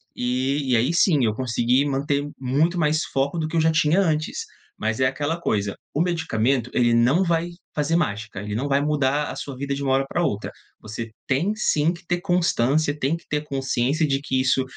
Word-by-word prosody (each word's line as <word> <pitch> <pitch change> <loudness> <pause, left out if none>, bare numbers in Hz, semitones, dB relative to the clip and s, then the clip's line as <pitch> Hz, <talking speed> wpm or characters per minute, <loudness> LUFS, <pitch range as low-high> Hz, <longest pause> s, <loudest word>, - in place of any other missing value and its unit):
e 130 +3 -1
e - - +5
aí 120 +7 +2
sim, 160 -6 +3
eu 110 - +1
consegui 125 +2 +1
manter 140 +1 -1
muito 145 +7 +1
mais 155 -1 +2 0.2
foco 140 +5 0
do 155 - -1
que 155 - -6
eu 165 - +3
já 160 +1 +3
tinha 160 +4 +3
antes. 160 - -1 0.4
Mas 110 +1 -1
é 130 - +5
aquela 145 +5 -1
coisa, 100 -9 -1 0.2
o 145 - -1
medicamento 135 -8 0
ele 120 -1 +3
não 120 +9 +4
vai 170 0 0 0.3
fazer 155 +3 +1
mágica, 105 - -2
ele 105 0 -4
não 135 +6 -1
vai 140 +1 +3
mudar 145 -1 +1
a - - -5
sua 140 - -6
vida 140 0 -2
de 140 - -4
uma 135 - 0
hora 135 0 +2
pra 175 - -1
outra. 105 -8 -2 0.3
Você 110 +1 -7 0.2
tem 160 +10 +1
sim 160 -6 +2
que 175 0 -13
ter 175 -1 0
constância, 155 -5 +1
tem 150 +4 0
que - - -20
ter 150 0 -1
consciência 135 +2 0
de 135 0 0
que 135 -3 -1
isso 130 0 +2
140 Hz, 210 wpm, -23 LUFS, 125-160 Hz, 0.4 s, e